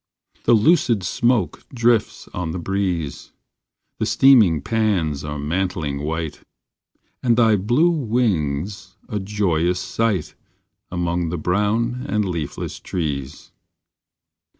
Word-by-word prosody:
The -, -, +5 dB
lucid 115 Hz, -, +3 dB
smoke 115 Hz, -, 0 dB
drifts 115 Hz, -3 st, +1 dB
on 85 Hz, -3 st, -4 dB
the -, -, -3 dB
breeze, 90 Hz, -4 st, -3 dB, 0.7 s
The -, -, 0 dB
steaming 115 Hz, -, +5 dB
pans 90 Hz, -8 st, 0 dB
are 75 Hz, 0 st, -4 dB
mantling 75 Hz, -2 st, -2 dB
white, 80 Hz, 0 st, -3 dB, 0.8 s
And 120 Hz, -2 st, +2 dB
thy 115 Hz, -3 st, +5 dB
blue 120 Hz, -, +3 dB
wing 110 Hz, -, 0 dB
s 95 Hz, -1 st, -10 dB
a 105 Hz, -, -3 dB
joyous 90 Hz, -4 st, 0 dB
sight, 105 Hz, -6 st, -1 dB, 0.6 s
Among 85 Hz, -1 st, -1 dB
the 85 Hz, -, -3 dB
brown 105 Hz, +9 st, 0 dB
and 105 Hz, -1 st, +1 dB
leafless 80 Hz, -6 st, -4 dB
trees. 70 Hz, -6 st, -4 dB
95 Hz, 110 wpm, -21 LUFS, 80-115 Hz, 0.8 s, The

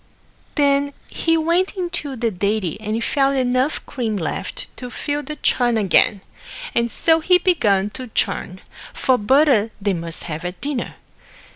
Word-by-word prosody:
Then 285 Hz, -1 st, +2 dB, 0.2 s
he 330 Hz, 0 st, +1 dB
went 340 Hz, +5 st, +1 dB
into 345 Hz, -6 st, -3 dB
the 230 Hz, -2 st, -1 dB
dairy 200 Hz, -2 st, -1 dB
and 220 Hz, +2 st, -2 dB
found 275 Hz, 0 st, +1 dB
enough 255 Hz, +3 st, 0 dB
cream 225 Hz, -5 st, -3 dB
left 165 Hz, -, -4 dB
to 250 Hz, -, -7 dB
fill 290 Hz, +3 st, -3 dB
the 300 Hz, +1 st, -6 dB
churn 240 Hz, -5 st, +1 dB
again, 200 Hz, 0 st, +3 dB, 0.5 s
and 235 Hz, 0 st, +1 dB
so 325 Hz, +7 st, +3 dB
he 360 Hz, +3 st, +4 dB
began 210 Hz, -, +2 dB
to 255 Hz, +2 st, -7 dB
churn, 190 Hz, -4 st, -2 dB, 0.3 s
for 260 Hz, -2 st, +2 dB
butter 255 Hz, -1 st, +4 dB
they 200 Hz, -1 st, 0 dB
must 165 Hz, -2 st, -2 dB
have 160 Hz, 0 st, -5 dB
at 180 Hz, +1 st, -5 dB
dinner. 280 Hz, -4 st, -3 dB
250 Hz, 150 wpm, -21 LUFS, 205-295 Hz, 0.5 s, he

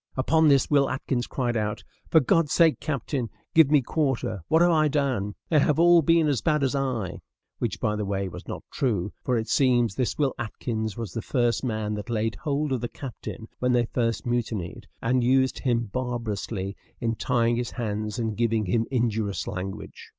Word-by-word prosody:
Upon 160 Hz, +4 st, +3 dB
this 140 Hz, -2 st, +4 dB
Will 140 Hz, -2 st, +3 dB
Atkins 130 Hz, -2 st, -2 dB
cried 120 Hz, -3 st, -1 dB
out, 105 Hz, -1 st, -2 dB, 0.3 s
"For 160 Hz, -, +6 dB
God's 155 Hz, +2 st, +2 dB
sake, 165 Hz, -3 st, +4 dB
captain, 135 Hz, -4 st, -2 dB, 0.2 s
give 160 Hz, -4 st, +6 dB
me 145 Hz, -3 st, +4 dB
quarter; 130 Hz, -, -1 dB
what 160 Hz, +2 st, +4 dB
have 175 Hz, -, +4 dB
I 155 Hz, -2 st, +4 dB
done? 130 Hz, -9 st, -1 dB
They 155 Hz, -, +4 dB
have 145 Hz, 0 st, +2 dB
all 170 Hz, 0 st, +6 dB
been 165 Hz, 0 st, +3 dB
as 140 Hz, -5 st, +1 dB
bad 150 Hz, -2 st, +1 dB
as 135 Hz, -, +1 dB
I," 125 Hz, -9 st, -2 dB, 0.4 s
which, -, -, -2 dB
by 105 Hz, -, 0 dB
the 105 Hz, -, -2 dB
way, 100 Hz, -1 st, -2 dB
was 90 Hz, -, -9 dB
not -, -, -6 dB
true, 105 Hz, -, -1 dB
for 125 Hz, -2 st, +1 dB
it 110 Hz, 0 st, -2 dB
seems 120 Hz, -4 st, +3 dB
this 125 Hz, +1 st, -1 dB
Will 140 Hz, -3 st, +1 dB
Atkins 110 Hz, -2 st, -3 dB
was 110 Hz, -7 st, -5 dB
the 115 Hz, -, -3 dB
first 120 Hz, -1 st, 0 dB
man 110 Hz, -4 st, -2 dB
that 105 Hz, +3 st, -5 dB
laid 110 Hz, -1 st, 0 dB
hold 145 Hz, +7 st, -2 dB
of 130 Hz, -3 st, 0 dB
the 120 Hz, -, -3 dB
captain 115 Hz, -3 st, -8 dB
when 125 Hz, 0 st, +1 dB
they 120 Hz, -1 st, +3 dB
first 115 Hz, 0 st, -1 dB
mutinied, 115 Hz, -7 st, -3 dB, 0.2 s
and 125 Hz, +2 st, +2 dB
used 130 Hz, +1 st, +2 dB
him 120 Hz, -2 st, +1 dB
barbarously 110 Hz, -4 st, -3 dB, 0.2 s
in 115 Hz, -1 st, 0 dB
tying 115 Hz, +1 st, +1 dB
his 120 Hz, -1 st, -2 dB
hands 105 Hz, -2 st, -3 dB
and 110 Hz, -3 st, -2 dB
giving 115 Hz, -1 st, +1 dB
him 110 Hz, +5 st, 0 dB
injurious 110 Hz, -5 st, -1 dB
language. 95 Hz, 0 st, -6 dB
120 Hz, 195 wpm, -26 LUFS, 110-135 Hz, 0.4 s, For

